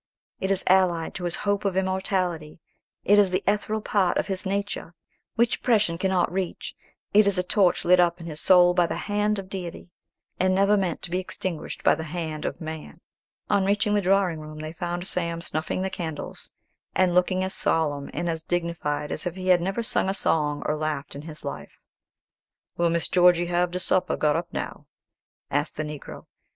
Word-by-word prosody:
It 190 - -2
is 195 -1 +1
allied 180 -3 +3
to 180 - -5
his 175 +1 -1
hope 205 0 +1
of 195 -2 0
immortality; 185 -4 -1 0.5
it 205 +1 +6
is 200 -2 +5
the 185 +2 -1
ethereal 210 +1 0
part 190 -4 +2
of - - +1
his 190 -1 -4
nature, 200 -3 -3 0.4
which 235 +1 +2
oppression 210 -8 +1
cannot 190 -2 +1
reach; 185 -2 -3 0.4
it 210 0 +6
is 200 -2 +1
a 180 - +1
torch 185 -1 +2
lit 180 +1 +6
up 175 0 +3
in 165 - -9
his 155 -2 -5
soul 180 -1 +6
by 175 -1 +3
the - - -3
hand 210 0 +1
of 195 -1 -5
Deity, 180 -2 -7 0.5
and 185 0 +3
never 200 +2 +4
meant 185 -5 -1
to 175 - -6
be 180 - +1
extinguished 185 -2 -5
by - - +5
the 160 +1 -4
hand 160 -1 -4
of - - -3
man." 160 0 -7 0.5
On 200 -2 +2
reaching 205 +1 +1
the 205 - +3
drawing 185 -3 +2
room, 155 0 -9
they 155 +1 -6
found 175 +1 -4
Sam 170 -3 -1
snuffing 165 +2 -3
the 190 - -1
candles, 160 -4 -5 0.4
and 185 -2 +3
looking 185 +1 +2
as 190 0 -2
solemn 145 -3 0
and 175 +3 -3
as 165 -1 -2
dignified 160 -4 -2
as - - -2
if 175 - -4
he 185 0 -3
had 180 -1 +5
never 195 +6 -1
sung 190 - 0
a 195 - 0
song 150 -5 0
or 150 - +1
laughed 155 -2 -3
in 140 - -7
his 155 -1 -9
life. 140 - -7 1.0
"Will 170 0 +2
Miss 170 0 0
Georgy 175 -1 +4
have 175 0 +1
de 180 +1 -3
supper 185 0 +1
got 150 -1 +2
up 170 +1 -2
now?" - - -5 0.6
asked 145 +2 -1
the 155 - -1
Negro. 150 -1 -8
180 Hz, 200 wpm, -25 LUFS, 165-190 Hz, 1.0 s, it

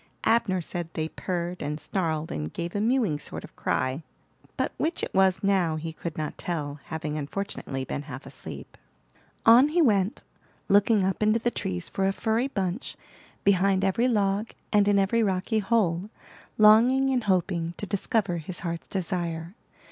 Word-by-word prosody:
Abner 220 -5 +2
said 170 0 -5
they 160 0 -2
purred 175 0 -4
and 150 +1 -3
snarled 160 -4 -2
and 75 +1 -4
gave 170 0 -4
a 205 - 0
mewing 225 - +1
sort - - -6
of - - -13
cry; 130 +4 -1 0.6
but - - 0
which 325 +3 -1
it - - -3
was 190 0 +3
now 190 -5 +2
he 160 +1 -5
could 170 +1 -6
not 155 -1 -4
tell, 150 -4 -3
having 155 -1 -4
unfortunately 145 -4 -4
been 140 - -4
half 140 -2 -9
asleep. - - -10 0.7
On 235 +5 +8
he 320 +4 0
went, 205 - +2 0.4
looking 205 +1 +4
up 190 +2 -1
into 215 +1 +4
the 240 +1 0
trees 90 - -3
for 195 0 0
a 195 - +1
furry 225 +5 0
bunch, 195 -3 -3 0.5
behind 195 0 +3
every 230 +6 +2
log, 205 -2 +1 0.2
and 205 -1 +4
in 205 -1 +4
every 200 +4 +2
rocky 200 +2 +1
hole, 200 -4 +1 0.5
longing 240 +6 +6
and 250 -3 0
hoping 175 -3 0
to - - -3
discover 200 -2 0
his 170 +2 -5
heart's 170 -2 -4
desire. 170 -2 -3
190 Hz, 165 wpm, -27 LUFS, 165-215 Hz, 0.7 s, On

